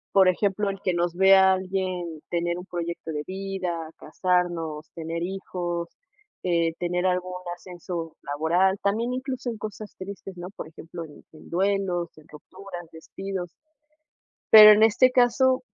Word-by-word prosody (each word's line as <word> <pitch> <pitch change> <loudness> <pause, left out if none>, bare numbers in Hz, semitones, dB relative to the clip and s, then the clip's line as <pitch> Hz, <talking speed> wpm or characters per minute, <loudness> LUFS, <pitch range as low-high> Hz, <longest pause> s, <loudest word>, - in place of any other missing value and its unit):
Por 190 -1 +7
ejemplo, 200 +2 0
el 195 0 -5
que 185 - 0
nos 175 0 -1
vea 190 0 +6
alguien 185 -4 -3
tener 175 0 -1
un 180 - -9
proyecto 170 -2 -5
de 150 -1 -3
vida, 185 -4 -4
casarnos, 165 -2 -1
tener 165 0 -4
hijos, 175 -2 -4 0.5
eh, 170 -2 +1
tener 180 +1 0
algún 180 0 -1 0.2
ascenso 175 -2 -7
laboral, 170 +7 +1
también 225 +5 0
incluso 255 -1 -3
en 230 - -5
cosas 215 0 -8
tristes, 195 -1 -8
¿no? 175 +1 -7
Por - - -7
ejemplo, 165 +1 -9
en 150 -2 -13
en 155 - -15
duelos, 185 -2 0
en 155 - -19
rupturas, 175 +3 -10
despidos. 185 +2 -6 1.0
Pero 215 -1 +11
en 210 +1 +5
este 230 +4 +5
caso, 255 +1 +3
180 Hz, 145 wpm, -25 LUFS, 170-195 Hz, 1.0 s, Pero